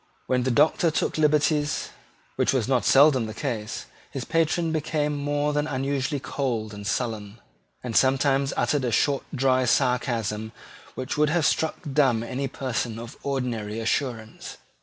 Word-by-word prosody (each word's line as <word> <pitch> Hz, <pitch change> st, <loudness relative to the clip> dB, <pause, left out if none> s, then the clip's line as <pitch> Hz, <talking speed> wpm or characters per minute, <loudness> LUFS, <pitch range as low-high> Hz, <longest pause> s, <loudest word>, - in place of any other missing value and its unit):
When 125 Hz, -1 st, +1 dB
the 130 Hz, -, 0 dB
Doctor 150 Hz, +6 st, +3 dB
took 160 Hz, 0 st, -1 dB
liberties, 150 Hz, 0 st, +2 dB, 0.5 s
which -, -, +2 dB
was 125 Hz, -4 st, 0 dB
not 130 Hz, -2 st, +1 dB
seldom 135 Hz, -4 st, +5 dB
the 110 Hz, -, -7 dB
case, 115 Hz, -7 st, -4 dB, 0.2 s
his -, -, -5 dB
patron 165 Hz, 0 st, +1 dB
became 150 Hz, -1 st, -1 dB
more 145 Hz, +1 st, -1 dB
than 150 Hz, +1 st, 0 dB, 0.2 s
usually 140 Hz, 0 st, -1 dB
cold 120 Hz, -6 st, -3 dB
and 100 Hz, 0 st, -7 dB
sullen, 110 Hz, -2 st, -3 dB, 0.4 s
and 120 Hz, -3 st, -4 dB
sometimes 135 Hz, +1 st, +3 dB
uttered 145 Hz, -3 st, +1 dB
a 120 Hz, -, 0 dB
short 140 Hz, +4 st, +2 dB
dry 130 Hz, -2 st, +2 dB
sarcasm 115 Hz, -4 st, 0 dB, 0.4 s
which 130 Hz, +3 st, -4 dB
would 150 Hz, -1 st, +4 dB
have 160 Hz, -1 st, +1 dB
struck 160 Hz, +2 st, +1 dB, 0.2 s
dumb 130 Hz, -6 st, +3 dB
any 130 Hz, +3 st, -3 dB
person 125 Hz, -4 st, -3 dB
of 120 Hz, +3 st, -8 dB
ordinary 120 Hz, -6 st, -3 dB
assurance. 115 Hz, -1 st, -3 dB
130 Hz, 150 wpm, -25 LUFS, 115-145 Hz, 0.5 s, seldom